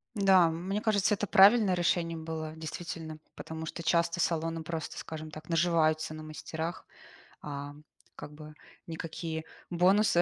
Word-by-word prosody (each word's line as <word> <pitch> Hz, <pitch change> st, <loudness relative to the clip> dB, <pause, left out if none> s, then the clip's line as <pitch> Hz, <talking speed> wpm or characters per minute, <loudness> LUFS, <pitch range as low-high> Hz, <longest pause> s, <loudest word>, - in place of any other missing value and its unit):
Да, 195 Hz, -3 st, +6 dB
м, 165 Hz, +2 st, -5 dB
мне 200 Hz, +2 st, 0 dB
кажется, 210 Hz, -1 st, +2 dB
это 205 Hz, -, -2 dB
правильное 205 Hz, +1 st, +7 dB
решение 170 Hz, -1 st, +1 dB
было 160 Hz, -1 st, -5 dB
действительно. 160 Hz, 0 st, -6 dB, 0.2 s
Потому 160 Hz, 0 st, -6 dB
что 165 Hz, -, -6 dB
часто 170 Hz, +1 st, +2 dB
салоны 165 Hz, -1 st, 0 dB
просто, 160 Hz, 0 st, -5 dB
скажем 155 Hz, -1 st, -7 dB
так, 155 Hz, +1 st, -10 dB
наживаются 160 Hz, -2 st, +2 dB
на 155 Hz, -, -7 dB
мастерах, 160 Hz, +2 st, -5 dB, 0.6 s
а, 145 Hz, -1 st, -6 dB, 0.4 s
как 150 Hz, -, -9 dB
бы, 150 Hz, 0 st, -11 dB, 0.3 s
никакие 160 Hz, 0 st, -5 dB, 0.3 s
бонусы 180 Hz, +2 st, +4 dB
165 Hz, 140 wpm, -30 LUFS, 155-175 Hz, 0.6 s, правильное